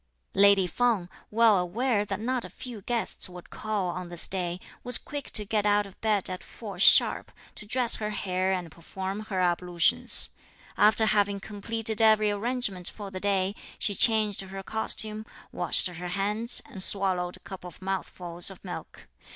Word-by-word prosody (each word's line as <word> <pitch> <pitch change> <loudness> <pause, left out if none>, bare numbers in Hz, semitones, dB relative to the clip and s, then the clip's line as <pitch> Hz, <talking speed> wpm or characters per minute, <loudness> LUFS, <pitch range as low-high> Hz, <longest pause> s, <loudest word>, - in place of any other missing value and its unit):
Lady 200 -1 +5
Feng, 215 -2 0 0.2
well 220 -2 +4
aware 210 +4 -1
that 195 -1 -4
not 250 +2 -2
a - - -8
few 240 -5 -10
guests 230 -2 -2
would 180 -1 -13
call 210 -4 -3
on 180 0 -7
this 175 -1 -1
day, 180 -2 -3 0.2
was 245 -1 +6
quick 290 -1 -7
to 210 - 0
get 210 0 0
out 205 0 +2
of 195 - -16
bed 215 -3 +3
at 185 0 -6
four - - -10
sharp, - - +5 0.2
to 210 - -12
dress 245 +1 +3
her 210 -1 -4
hair 185 -2 -2
and 180 -4 -3
perform 190 +5 -6
her 210 -3 -4
ablutions. 175 -1 +3 0.5
After 215 +1 +3
having 205 -2 +1
completed 220 +2 0
every 215 -1 +4
arrangement 205 -4 -1
for 205 -2 -9
the 185 - -6
day, 195 -1 0 0.2
she 205 - +4
changed 215 -2 +3
her 195 0 -8
costume, 215 0 -1 0.3
washed - - +1
her 180 -1 -5
hands, 205 +6 0
and 190 - -4
swallowed 185 -2 +2
a - - -24
couple 190 -2 -10
of 175 - -13
mouthfuls 185 -2 -3
of 195 0 -13
milk. 180 - -8
200 Hz, 170 wpm, -27 LUFS, 185-215 Hz, 0.5 s, was